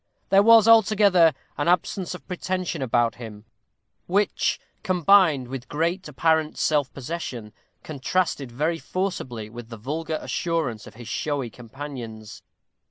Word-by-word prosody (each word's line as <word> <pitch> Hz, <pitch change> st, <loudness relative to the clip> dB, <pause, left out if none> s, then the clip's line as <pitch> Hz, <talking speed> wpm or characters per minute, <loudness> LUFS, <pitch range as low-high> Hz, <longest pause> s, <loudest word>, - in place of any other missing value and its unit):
There 195 Hz, 0 st, +6 dB
was, 225 Hz, 0 st, +7 dB
altogether, 205 Hz, -6 st, +6 dB, 0.3 s
an 145 Hz, -, 0 dB
absence 180 Hz, +1 st, 0 dB
of -, -, -13 dB
pretension 185 Hz, -3 st, -3 dB
about 120 Hz, -2 st, +1 dB
him, 110 Hz, -3 st, -10 dB, 0.6 s
which, 200 Hz, +3 st, +1 dB, 0.2 s
combined 180 Hz, -7 st, +4 dB
with 130 Hz, -1 st, -7 dB
great 170 Hz, +5 st, -1 dB
apparent 160 Hz, +1 st, +1 dB
self 145 Hz, -3 st, +1 dB
possession, 130 Hz, -6 st, -6 dB, 0.3 s
contrasted 150 Hz, -2 st, -2 dB
very 155 Hz, +7 st, -1 dB
forcibly 130 Hz, -, -4 dB
with 115 Hz, +1 st, -10 dB
the 115 Hz, -, -8 dB
vulgar 155 Hz, +7 st, -3 dB
assurance 155 Hz, -11 st, -2 dB
of -, -, -13 dB
his 120 Hz, 0 st, -11 dB
showy 140 Hz, -5 st, -2 dB
companions. 120 Hz, -3 st, -9 dB
155 Hz, 125 wpm, -24 LUFS, 120-180 Hz, 0.6 s, was